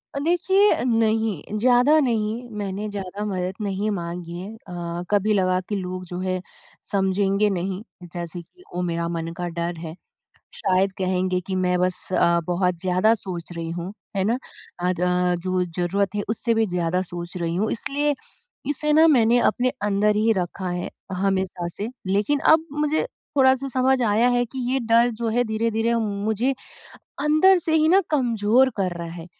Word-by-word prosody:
अ, - - -1
देखिए 380 +5 +3
अ, - - -2
नहीं। 220 -5 0
ज़्यादा 250 +7 +5
नहीं 235 -2 -1
मैंने 200 +1 -3
ज़्यादा 200 0 -5
मदद 185 -2 -2
नहीं 200 +1 -1
माँगी 170 -2 -5
है 195 +4 -7
अ, 175 -4 -6
कभी 205 +1 +3
लगा 185 -2 +2
कि 210 - -1
लोग 185 -1 -4
जो 180 +1 -6
है 185 0 -2 0.5
समझेंगे 195 +1 +2
नहीं 190 +1 -2 0.3
जैसे 175 0 -5
कि 360 - -21
वो 180 - -2
मेरा 170 -1 -1
मन 165 0 -3
का 175 - -3
डर 170 0 -2
है 160 -1 -6 0.6
शायद 190 +1 +1
कहेंगे 185 0 0
कि 190 - -3
मैं 180 -1 +1
बस 180 0 -1
अ, 170 -1 +3
बहुत 180 -1 0
ज़्यादा 185 +4 +3
सोच 180 -5 -7
रही 165 -1 -5
हूँ, 175 +3 -5 0.2
है 190 - +1
ना? 230 +4 +1 0.4
अ, 180 +1 +1
ज 180 0 +2
जो 185 -1 +1
ज़रूरत 195 +3 0
है 205 - -1
उससे 230 +1 0
भी 225 0 +2
ज़्यादा 180 -1 0
सोच 175 +1 -6
रही 170 -1 -2
हूँ 215 +3 0
इसलिए 290 +5 -1 0.6
इसे 300 +1 0
ना 320 +2 +6
मैंने 235 -1 +4
अपने 250 +3 0
अंदर 210 +1 +2
ही 220 +2 +3
रखा 185 -1 -3
है 175 0 -3 0.3
हमेशा 190 -2 0
से 210 - -3 0.2
लेकिन 205 +10 +1 0.2
अब 320 0 0
मुझे 300 +7 0 0.3
थोड़ा-सा 265 0 +4
समझ 260 +1 +2
आया 220 +1 +3
है 245 0 +2
कि 255 +3 -9
ये 270 - +2
डर 230 +1 +4
जो 235 - -1
है 240 +2 +2
धीरे-धीरे 225 +1 0
मुझे 215 +3 0 0.7
अंदर 310 +6 +5
से 320 -2 -1
ही 315 0 +4
ना 375 +4 +6
कमज़ोर 245 -2 +3
कर 185 -3 0
रहा 170 0 -5
है। 170 -1 -8
200 Hz, 175 wpm, -23 LUFS, 180-235 Hz, 0.7 s, ना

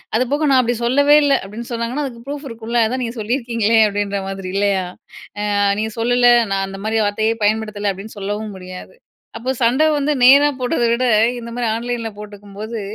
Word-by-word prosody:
அது 245 - +3
போக, 300 +2 +1
"நான் 265 -1 +5
அப்பிடி 240 0 -1
சொல்லவே 285 +4 +4
இல்ல" 285 -1 +3
அப்பிடின்னு 215 +5 -8
சொன்னாங்கன்னா, 235 +5 -2
அதுக்கு 235 -3 -8
ப்ரூஃப் 285 +1 -6
இருக்கும்ல, 230 +1 -2
அதான் 255 +3 -2
நீங்க 230 -1 -4
சொல்லியிருக்கீங்களே 230 -1 0
அப்பிடின்ற 205 -1 -2
மாதிரி 195 -1 -6
இல்லயா? 200 -2 +1 0.7
"ஆ - - +1 0.2
நீங்க 220 +1 -2
சொல்லல, 245 +1 +3 0.2
நான் 195 0 0
அந்தமாரி 205 +3 -3
வார்த்தையே 215 +2 0
பயன்படுத்தல" 210 -1 0
அப்பிடின்னு 195 +3 -11
சொல்லவும் 205 +1 -4
முடியாது. 185 - -10 0.4
அப்போ 245 +3 -3
சண்ட 250 +6 +3
வந்து 290 +1 0
நேரா 280 +3 +7
போட்டத 245 -1 0
விட, 240 +2 0 0.3
இந்தமாரி 235 +1 -4
ஆன்லைன்ல 235 -1 -3
போட்டுக்கும்போது, 210 +2 -8
230 Hz, 165 wpm, -19 LUFS, 205-245 Hz, 0.7 s, நேரா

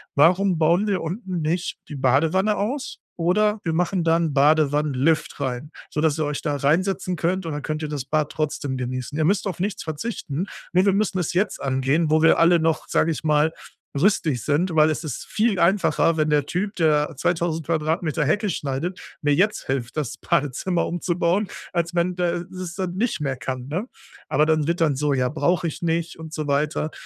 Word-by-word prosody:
„Warum 180 +5 +4
bauen 170 +6 +3
wir 195 -2 0
unten 180 +1 -4
nicht 165 +4 -1
die 150 - -6
Badewanne 160 - +2
aus 255 +7 -3 0.2
oder 210 +5 +2
wir 165 - -1
machen 180 +1 0
da 165 0 +3
'n 165 -3 0
Badewannenlift 150 0 +2
rein, 135 +2 -3 0.2
sodass 150 0 +1
ihr 155 - +1
euch 145 0 -3
da 145 - -1
reinsetzen 180 +6 +1
könnt, 175 +3 -1
und 160 - -3
dann 150 - -4
könnt 155 0 -3
ihr 150 - -3
das 145 -4 -4
Bad 150 +1 0
trotzdem 145 -3 -2
genießen. 130 +3 -4
Ihr 155 - +2
müsst 200 +4 +1
auf 180 -3 -4
nichts 200 +2 -2
verzichten.“ 160 0 -4 0.3
Ne, 185 +2 +4
wir 200 - +4
müssen 200 -2 0
es 175 - -2
jetzt 195 +3 0
angehen, 135 +4 +1
wo 155 0 +3
wir 165 +1 +5
alle 170 0 +5
noch, 160 -1 0
sage 165 - +2
ich 160 - -4
mal, 155 +1 +2 0.5
rüstig 155 - +2
sind. 165 +4 0
Weil 155 0 +5
es 155 - -3
ist 150 -6 -5
viel 215 -3 0
einfacher, 170 -2 +3
wenn 155 -1 +1
der 145 -2 +2
Typ, 200 +4 -2
der 155 -2 +2
2.000 165 -1 0
Quadratmeter 160 -1 0
Hecke 210 +9 +1
schneidet, 145 +7 -3 0.2
mir 145 0 +3
jetzt 200 +7 +1
hilft, 130 0 -3
das 145 -7 -3
Badezimmer 145 +6 0
umzubauen, 175 +3 0 0.3
als 170 0 -1
wenn 175 +1 +1
der 175 -1 -1
das 185 -2 -6
dann 185 -2 -3
nicht 200 -7 -1
mehr 135 -2 -2
kann, 130 -1 -5
ne? 180 +10 -3 0.4
Aber 150 - +3
dann 155 -2 +1
wird 170 0 0
dann 150 -4 +3
so: 145 +1 0
„Ja, 125 -2 +1
brauche 170 +3 +1
ich 155 - -6
nicht“ 170 0 -1
und 160 -1 -8
so 155 -1 -4
weiter. 150 +2 0
160 Hz, 195 wpm, -23 LUFS, 150-180 Hz, 0.5 s, wir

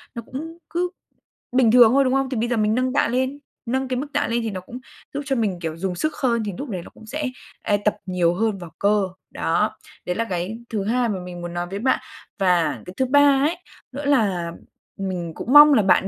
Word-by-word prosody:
nó 235 - -4
cũng 320 +7 -7
cứ 355 +1 -1 0.6
bình 250 -3 +4
thường 240 -2 +8
thôi, 275 +1 +5
đúng 255 -1 +1
không? 270 0 +1
Thì 255 - -2
bây 235 +2 0
giờ 240 - +1
mình 215 0 +2
nâng 255 +1 0
tạ - - +3
lên, 260 +4 -1 0.3
nâng 260 +3 -1
cái 255 -1 -2
mức 275 +4 -3
tạ - - +1
lên 235 +1 0
thì 225 - -2
nó 185 -2 -5
cũng 240 +7 -9 0.3
giúp 285 - -2
cho 275 -1 0
mình, 205 -7 -1
kiểu, 165 -1 -4
dùng 185 +1 -2
sức 310 - -1
hơn 235 -4 +1
thì 205 - -2
núc 275 +9 -6
đấy 185 -5 -3
nó - - -12
cũng - - -15
sẽ, 290 +7 -3 0.4
a, 205 - +2
tập 210 - +3
nhiều 180 -2 +1
hơn 215 +1 0
vào 175 -3 -9
cơ, 205 0 +3 0.3
đó, - - 0 0.3
đấy 180 - -1
là 230 - 0
cái 185 +5 -3
thứ 215 -4 -2
hai 240 +2 +1
mà 195 -3 -2
mình 180 -1 -8
muốn 175 0 -6
nói 175 0 -3
với 195 +2 -4
bạn. 260 +4 +2 0.4
Và 180 -4 +2
cái 180 - -9
thứ 260 - +2
ba 280 +1 +5
ấy 325 +3 0 0.3
nữa 280 +2 -6
là 200 -12 +1 0.5
mình 180 -3 -3
cũng 250 - -3
mong 295 0 +10
là 235 - +5
bạn 190 0 +4
225 Hz, 245 wpm, -23 LUFS, 185-265 Hz, 0.6 s, mong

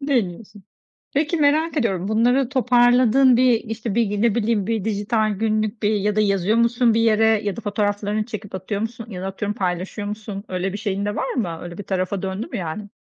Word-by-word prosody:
Deniyorsun. 210 -7 -2 0.5
Peki, 310 +3 +1
merak 310 +2 +2
ediyorum 195 -7 0
bunları 245 +4 +2
toparladın 250 0 +4
bir, 255 0 +5
işte, 225 0 -5
ne 220 0 +1
bileyim, 220 -3 0
bir 220 -3 -1
dijital 215 +1 0
günlük 215 +1 -1
bir 210 +1 +2
ya 205 +1 0
da 215 - +3
yazıyor 200 +1 +1
musun 235 0 +3
bir 225 - +2
yere? 220 -1 +3
Ya 205 -2 -2
da - - -5
fotoğraflarını 205 0 -1
çekip 210 -4 -7
atıyor 200 +2 -4
musun? 230 0 -5
Ya 180 -3 -6
da - - -4
atıyorum 205 +2 -3
paylaşıyor 185 +2 -3
musun? 210 -1 -6
Öyle 185 +1 -3
bir - - -3
şeyin 200 -1 -2
de 205 - -2
var 265 - -2
mı? 180 -10 -2
Öyle 175 -1 -8
bir 205 - -6
tarafa 185 0 -2
döndü 190 +3 -4
mü 240 - -5
yani? 195 +3 -5
215 Hz, 200 wpm, -22 LUFS, 200-235 Hz, 0.5 s, bir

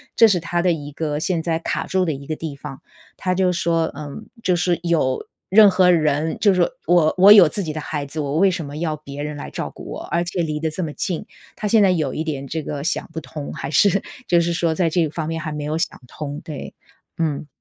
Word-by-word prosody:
这 230 - +7
是 185 -4 +2
她 170 +1 -1
的 180 0 +3
一 145 -3 -4
个 150 -1 -2
现 165 0 -1
在 165 -1 0
卡 - - -2
住 185 -1 +1
的 160 - 0
一 140 0 -9
个 155 - -2
地 160 -3 -5
方。 135 -1 -9 0.4
她 185 - -1
就 185 -1 +2
说： 165 -2 0
“嗯， 145 -2 -7 0.2
就 180 - +2
是 175 -1 +1
有 155 -7 +1 0.2
任 210 +1 +8
何 185 -1 +4
人 155 -1 +1
就 205 -3 +4
说 180 -2 +2 0.2
我 170 -3 +4
我 195 +3 +8
有 195 -6 +9
自 200 - -3
己 155 -3 -4
的 155 - -4
孩 145 -1 -4
子， 145 +3 -7
我 145 0 -1
为 195 +3 +5
什 175 -2 -3
么 145 0 -7
要 160 -1 -1
别 145 -1 -8
人 150 0 -4
来 145 - -7
照 - - -4
顾 - - -11
我， - - -6
而 170 0 +2
且 175 +1 -2
离 155 -2 -2
得 160 - 0
这 155 +4 -5
么 155 -2 -4
近。” 180 +4 -3 0.3
她 210 - -2
现 220 +1 +4
在 195 - +5
有 155 -7 0
一 155 - -2
点 145 -4 -4
这 160 +3 -3
个 145 -1 -5
想 - - -2
不 160 - -4
通， 150 -2 -7
还 135 - -5
是， 195 +6 +4 0.3
就 175 - +4
是 170 0 +1
说 170 -1 +1
在 175 0 +2
这 160 -1 +1
方 155 +1 -4
面 165 0 -3
还 155 -1 -4
没 150 0 -4
有 155 +1 -1
想 170 - -2
通。 145 +2 -6
对， 150 -3 -7 0.4
嗯。 155 -3 -1
160 Hz, 275 characters per minute, -21 LUFS, 150-175 Hz, 0.4 s, 有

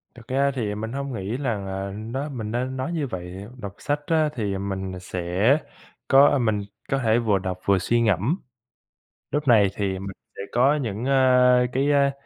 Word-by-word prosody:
Thật 120 -2 -14
ra 140 +2 +2
thì 105 -5 -2
mình 110 +2 -4
hông 140 -1 -4
nghĩ 105 +3 -3
rằng, 110 -8 -2
à, 95 +1 -4
nó 120 +7 -4
mình 110 -6 -5
nên 130 +3 -2
nói 130 +5 -2
như 150 -5 -1
vậy, 95 -1 -7
đọc 100 -4 -7
sách 145 0 -1
á 160 -2 +3
thì, 105 -4 -2
à, - - -2
mình 95 -1 -3
nà 90 - -7
sẽ 90 - +1 0.5
có 140 +1 +6
mình 110 -4 +1 0.3
có 135 - +1
thể 115 -1 +3
vừa 105 -4 +2
đọc 95 -1 -4
vừa 100 -1 +4
suy 115 +6 +1
ngẫm. 110 - +2 0.9
Lúc 145 -1 -1
này 110 -4 +6
thì 95 -2 -2
mình 95 0 -6 0.2
sẽ - - -7
có 130 +5 +4
những, 115 -5 -3
a, 125 -2 +5
cái, 140 +3 +2
á, 140 -1 +4
115 Hz, 200 wpm, -24 LUFS, 100-135 Hz, 0.9 s, có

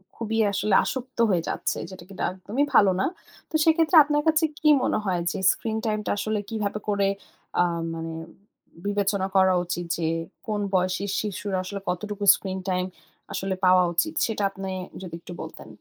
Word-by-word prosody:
খুবই 225 -1 -3 0.2
আসলে 200 0 0
আসক্ত 260 0 -5
হয়ে 175 -3 +2
যাচ্ছে, - - -1
যেটা 185 -2 -10
কিনা 195 - -5
একদমই 210 +10 -1
ভালো 200 -2 +7
না। - - +2 0.4
তো - - -5
সেক্ষেত্রে 325 +1 +4
আপনার 295 0 +1
কাছে 320 +1 +4 0.2
কি 305 - +3
মনে - - +1
হয় 180 -2 0
যে, - - -4
স্ক্রিন 220 -1 -3
টাইম 215 -1 0
টা - - 0
আসলে 215 0 -1
কিভাবে 210 -2 -2
করে, 200 -1 +2 0.5
আ - - +6 0.3
মানে 165 0 -5 0.7
বিবেচনা 200 -1 0
করা 190 -1 +5
উচিত? 175 0 -3
যে, 165 - -1 0.4
কোন 210 -1 -1
বয়সী 185 +1 +1 0.2
শিশু 210 -2 -5 0.2
আসলে, 200 +2 -5
কতটুকু 205 +3 -3
স্ক্রিন 190 -1 -5
টাইম 180 0 0 0.5
আসলে 190 0 -2
পাওয়া 185 0 +6
উচিত 315 - +1
সেটা 215 -2 -2
আপনি 195 0 -5 0.3
যদি 180 -3 -8
একটু 175 +1 -10
বলতেন? - - -9
200 Hz, 170 wpm, -25 LUFS, 185-220 Hz, 0.7 s, ভালো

